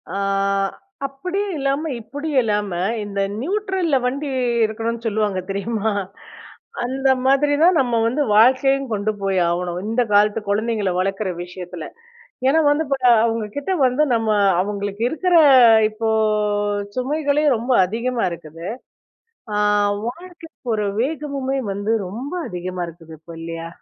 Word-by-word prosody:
ஆ - - -1 0.9
அப்படியும் 365 +8 -3
இல்லாம, 275 +2 0 0.2
இப்படியும் 285 +3 -1
இல்லாம 210 -2 -1 0.3
இந்த 200 -1 -3 0.2
நியூட்ரல்ல 380 -2 0
வண்டி 280 +3 -2 0.4
இருக்கணும்ன்னு 230 +2 -4
சொல்லுவாங்க 210 -3 0
தெரியுமா? 215 +2 -1 0.9
அந்த 265 +2 0 0.2
மாதிரி 275 +2 +3
தான் 350 0 +5
நம்ம 240 -2 -1
வந்து 285 +6 0
வாழ்க்கையும் 265 +4 +4
கொண்டு 210 +1 0
போய் 195 -1 +1
ஆவணும், 175 0 -2
இந்த 230 +3 +1
காலத்து 210 +2 +3
குழந்தைங்களை 210 -1 0
வளர்க்குற 195 +1 -1
விஷயத்தில. 180 -2 -8 0.6
ஏன்னா 310 +4 +4
வந்து 290 +2 +2
இப்ப 275 - 0 0.3
அவங்க 225 -1 -1
கிட்ட 285 +6 -3
வந்து 255 +4 +2
நம்ம 225 -1 -1 0.3
அவங்களுக்கு 200 +1 -4
இருக்கிற, 360 +3 +1 0.5
இப்போ 220 +1 -3 0.9
சுமைகளே 290 +3 0
ரொம்ப 240 +4 -3
அதிகமா 230 +5 -2
இருக்குது. 165 +1 -8 0.9
ஆ - - 0 0.5
வாழ்க்கை 335 +5 -8 0.3
ஒரு 210 -1 -1 0.2
வேகமுமே 275 -2 -2
வந்து 205 +3 -2 0.2
ரொம்ப 245 - -6 0.2
அதிகமா 180 0 -5
இருக்குது 165 -1 -13
இப்போ 165 +1 -12
இல்லையா? 165 0 -6
230 Hz, 125 wpm, -21 LUFS, 200-280 Hz, 0.9 s, தான்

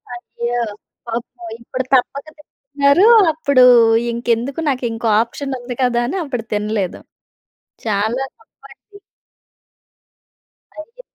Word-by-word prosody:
అయ్యో! 240 0 -4 0.5
పాపం. 235 0 -6
ఇప్పుడు 255 +2 -4
తప్పక 275 +3 -1
తింటున్నారు. 285 +5 +1 0.2
అప్పుడు 280 -4 +2 0.5
ఇంకెందుకు 235 +4 -2
నాకు 260 -2 -2
ఇంకో 225 +1 -4
ఆప్షన్ 270 +3 -5
ఉంది 245 0 -7
కదా! 240 -1 +1
అని 335 - -3
అప్పుడు 250 -6 -4
తినలేదు. 210 -2 -2 0.9
చాలా 220 +5 -1
తప్పండీ. 275 - -19 1.8
అదే 465 +10 -15
250 Hz, 95 wpm, -18 LUFS, 235-280 Hz, 1.8 s, అప్పుడు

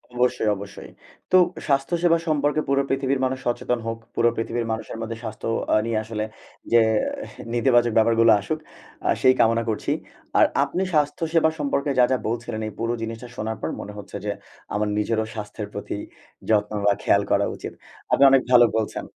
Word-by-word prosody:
অবশ্যই, 125 -3 +1
অবশ্যই। 100 0 -10 0.4
তো 185 - +7 0.3
স্বাস্থ্য 140 +4 +1
সেবা 165 -1 +5
সম্পর্কে 150 0 +1
পুরো 140 0 +3
পৃথিবীর 135 0 0
মানুষ 130 0 -2
সচেতন 120 0 -1
হোক। 115 0 -2 0.2
পুরো 120 0 +4
পৃথিবীর 115 +1 -2
মানুষের 110 0 -4
মধ্যে 115 0 -4
স্বাস্থ্য 110 0 -6 0.3
আ - - +6
নিয়ে 115 -1 -1
আসলে 110 -1 -4 0.5
যে, 120 - +7 0.7
নেতিবাচক 120 -2 +3
ব্যাপারগুলো 115 0 +5
আসুক, 155 +10 -3 0.5
আ - - +2
সেই 130 0 +6
কামনা 115 +1 +3
করছি। 110 - -2 0.5
আর - - +7 0.2
আপনি 185 +2 -1
স্বাস্থ্য 150 +1 +1
সেবা 160 -1 +4
সম্পর্কে 140 0 0
যা, - - +7
যা 130 - +3
বলছিলেন। 115 -1 -3
এই - - -5
পুরো 115 +1 0
জিনিসটা 115 +2 -5
শোনার 110 -2 -3
পর - - -2
মনে 105 - -8
হচ্ছে 100 -1 -7
যে, 105 - 0 0.4
আমার 105 0 0
নিজেরও 110 +1 0
স্বাস্থ্যের 105 0 -6
প্রতি 100 0 -5 0.5
যত্ন 105 -1 +2
বা 100 - +5
খেয়াল - - +4
করা - - +3
উচিত। - - -7 0.4
আপনি 140 - +5
অনেক 135 -1 +6
ভালো 120 -1 +8
বলছেন। 110 - -2
115 Hz, 175 wpm, -23 LUFS, 110-135 Hz, 0.7 s, ভালো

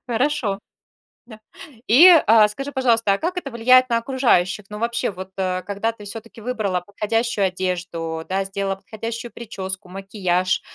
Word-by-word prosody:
Хорошо. 245 -4 0 0.7
Да. 220 -2 -13 0.5
И, 275 +11 +8 0.2
а, 215 -1 +7
скажи, 275 +7 -6
пожалуйста, 235 -6 +2
а - - 0
как 360 - -3
это 275 -6 -4
влияет 255 +2 +4
на 235 - +2
окружающих? 230 -6 +1
Ну, 210 - -7
вообще, 235 -1 -1
вот, 185 0 -9
э, 185 -1 -1
когда 205 +3 -2
ты 225 -2 -14
всё-таки 225 +2 -9
выбрала 210 -6 -2
подходящую 210 +2 -1
одежду, 175 -3 -4
да, 190 +1 -1
сделала 195 0 -3
подходящую 225 +4 -7
причёску, 190 -4 -7
макияж, 185 -1 -1
210 Hz, 150 wpm, -21 LUFS, 190-235 Hz, 0.7 s, И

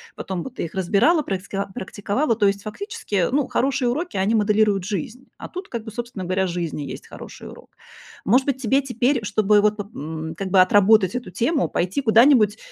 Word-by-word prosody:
Потом 185 -3 -5
бы - - -6
ты 245 - -5
их 165 - -10
разбирала, 210 - +3
праиск 195 -6 -5 0.2
практиковала. 205 +7 -2
То 210 -2 +1
есть, 200 0 -1
фактически, 405 - -6
э, 180 -3 +2
ну, 280 -1 +1
хорошие 265 -1 0
уроки, 300 - -2
они 200 +4 +1
моделируют 210 -2 +2
жизнь, 210 - -5
а - - -8
тут, 370 +1 -8
как 235 -2 -5
бы, 220 - -7
собственно 235 -5 -6
говоря, 185 +1 0
жизнь 170 -3 -3
и - - -5
есть - - -8
хороший - - -11
урок. - - -13 0.6
Может 250 +6 +3
быть, 265 -2 -1
тебе 270 +3 +2
теперь, 250 0 0
чтобы 210 0 +3
вот 210 0 +2
поп 205 +1 -8
м, 160 +1 -6
как 190 +2 -4
бы 190 - +5
отработать 200 +1 +4
эту 250 - -5
тему, 285 +5 0
пойти 185 +10 -1
куда-нибудь 225 -3 +5
215 Hz, 205 wpm, -22 LUFS, 190-250 Hz, 0.6 s, бы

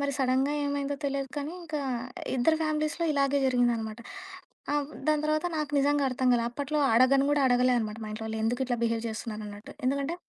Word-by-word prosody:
మరి 280 0 0
సడెన్‌గా 265 +2 +2
ఏమైందో 285 0 -1
తెలీదు 275 -1 -1
కానీ 290 +3 -3
ఇంకా 310 -3 -4 0.6
ఇద్దరి 315 +6 +3
ఫ్యామిలీస్‌లో 310 +2 -1
ఇలాగే 280 0 +2
జరిగిందనమాట. 235 -3 +1 0.7
ఆ! - - +1
వ్ - - -14 0.2
దాని 305 0 +2
తర్వాత 310 +3 +1
నాకు 300 -1 -2
నిజంగా 285 0 +2
అర్థం 255 0 0
కాలేదు. 235 -1 +2
అప్పట్లో 290 +4 -2
అడగను 270 +3 +5
గూడా 290 -1 +2
అడగలే 250 0 +4
అనమాట. 215 0 -4
మా 215 - -6
ఇంట్లో 220 +1 -6
వాళ్లు 220 0 -3
ఎందుకు 245 +4 0
ఇట్లా 245 -1 0
బిహేవ్ 230 0 0
చేస్తున్నారన్నట్టు. 215 -2 -7
ఎందుకంటే 280 +4 0
275 Hz, 180 wpm, -28 LUFS, 240-290 Hz, 0.7 s, అడగను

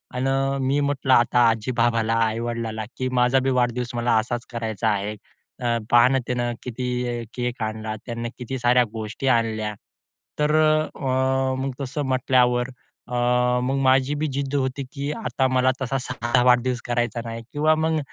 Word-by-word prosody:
अन 125 +1 0
अ, 135 +1 +1
मी 140 +2 +2
म्हटलं 135 -2 +1
आता 120 0 +4
आजी-बाबाला, 115 0 +1
आई-वडिलाला 115 -1 -3
की 130 0 -1
"माझा 125 +2 +4
बी, 130 +1 0
वाढदिवस 125 0 0
मला 120 0 +1
असाच 120 +2 -3
करायचा 115 -2 -2
आहे, 105 0 -1 0.5
अं, 120 -2 0
पहा 120 0 +7
ना, 135 +1 +2
त्यानं 120 -1 -1
किती 125 -1 -3
केक 125 -1 -3
आणला 110 0 -4
त्यानं, 120 -1 -4
किती 130 +1 -5
साऱ्या 125 +1 +4
गोष्टी 110 +4 -4
आणल्या." 110 -2 -2 0.7
तर 150 +1 +2
अ, 155 0 +3
अं, 130 -1 0
मग 135 - -2
तसं 140 +2 -3
म्हटल्यावर 125 -1 +2 0.4
अ, 125 - -8 0.5
मग 135 +2 0
माझी 130 +2 +3
बी 155 +1 -1
जिद्द 140 +1 -2
होती 135 0 -1
की 140 +1 -3
आता 140 -11 -1
मला 130 0 +2
तसा 135 +1 -1
साधा 125 -1 0
वाढदिवस 125 0 +3
करायचा 120 -1 -1
नाही 115 0 -5
किंवा 155 +2 +3
मग 160 0 +1
125 Hz, 160 wpm, -23 LUFS, 120-135 Hz, 0.7 s, पहा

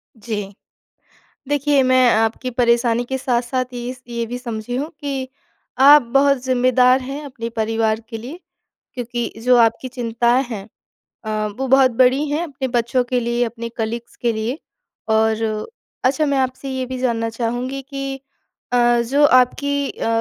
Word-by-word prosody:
जी। 210 -3 -5 1.0
देखिए, 290 -1 +2
मैं 255 -1 +4
आपकी 225 +3 0
परेशानी 235 -1 +2
के 265 - 0
साथ-साथ 250 0 0
ये 245 +1 -4
स 250 - -21
ये 235 -1 -3
भी 245 +2 -5
समझी 235 -1 -5
हूँ 285 +4 -2
कि 270 -2 -3 0.5
आप 285 +2 +8
बहुत 280 0 +4
ज़िम्मेदार 255 0 +3
हैं 275 +3 -6
अपने 240 -4 -6
परिवार 220 0 0
के 225 -2 -6
लिए। 270 +10 -9 0.5
क्योंकि 240 -2 -4
जो 250 0 +5
आपकी 230 +2 +2
चिंताएँ 240 0 +1
हैं 200 -3 -6 0.6
अ, 215 0 -1
वो 265 - -1
बहुत 265 0 +5
बड़ी 260 +4 +4
हैं 305 +3 0
अपने 275 -5 -4
बच्चों 235 +2 +1
के 250 0 -1
लिए, 240 +1 0
अपने 230 0 -5
कलीग्स 230 +1 -4
के 235 -1 0
लिए। 225 +6 -3 0.5
और 220 0 +2 0.6
अच्छा 275 +4 +2
मैं 280 -1 +1
आपसे 260 +1 -2
ये 260 -1 -2
भी 255 0 -5
जानना 230 -3 0
चाहूँगी 245 +4 -3
कि 275 0 -6 0.5
अ, 240 -1 +4
जो 290 +1 +4
आपकी 280 +2 +2
अ, - - -5
250 Hz, 155 wpm, -20 LUFS, 230-265 Hz, 1.0 s, आप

